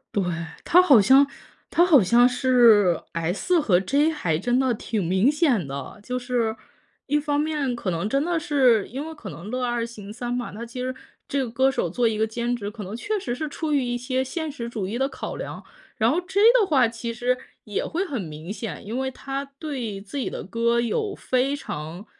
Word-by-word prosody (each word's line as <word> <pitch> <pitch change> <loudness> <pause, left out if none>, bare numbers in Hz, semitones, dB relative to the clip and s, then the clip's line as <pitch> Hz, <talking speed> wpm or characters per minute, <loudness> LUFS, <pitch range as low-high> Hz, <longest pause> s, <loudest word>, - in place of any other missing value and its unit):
对， 200 - +2 0.4
他 355 - +5
好 285 - +7
像 265 +7 +6 0.5
他 345 - +4
好 315 - +6
像 240 +6 +5
是 240 - +4
S 180 - +1
和 185 -11 +3
J 285 - +2
还 170 - -1
真 245 +8 +1
的 260 -1 +2
挺 215 -2 -2
明 190 - +3
显 270 - +1
的。 140 +8 -7
就 250 +2 -3
是， 245 -3 -1 0.5
一 295 +1 +2
方 290 0 0
面 295 -5 -1
可 225 -5 -3
能 170 +3 -1
真 275 +6 +1
的 345 -1 0
是 265 - +3
因 275 +6 -5
为 320 - -7
可 205 - -8
能 170 +7 -9
乐 250 +1 -1
二 240 -1 -1
行 210 -3 -8
三 240 +1 -5
嘛， 245 -1 -3
他 225 - -6
其 235 +2 -8
实 255 +1 -2 0.3
这 275 -1 0
个 245 - -4
歌 260 +4 +2
手 180 - -1
做 235 +7 +1
一 225 - 0
个 220 +1 +1
兼 235 +2 -2
职， 205 -4 -5
可 210 0 -8
能 200 +4 -6
确 420 - -2
实 255 -10 -3
是 300 +5 -4
出 305 +1 -3
于 275 - +2
一 245 0 -1
些 255 +1 -1
现 315 +3 -4
实 235 -4 -6
主 210 -5 -3
义 230 +5 -3
的 270 +1 +1
考 - - -6
量。 - - -7 0.3
然 230 -1 +3
后 340 +5 +1
J 380 +3 -1 0.2
的 405 - +2
话， 265 -7 +4
其 230 +1 -5
实 245 +2 0 0.3
也 210 - -3
会 355 +4 -2
很 275 - -3
明 160 +2 -7
显， 220 -2 -6
因 225 +5 -3
为 265 0 -1
他 270 +1 -5
对 255 -10 -4
自 200 +8 -6
己 260 - -2
的 - - -6
歌 230 +4 +1
有 395 - -1
非 260 +2 0
常 165 - -7
245 Hz, 240 characters per minute, -24 LUFS, 215-280 Hz, 0.5 s, 好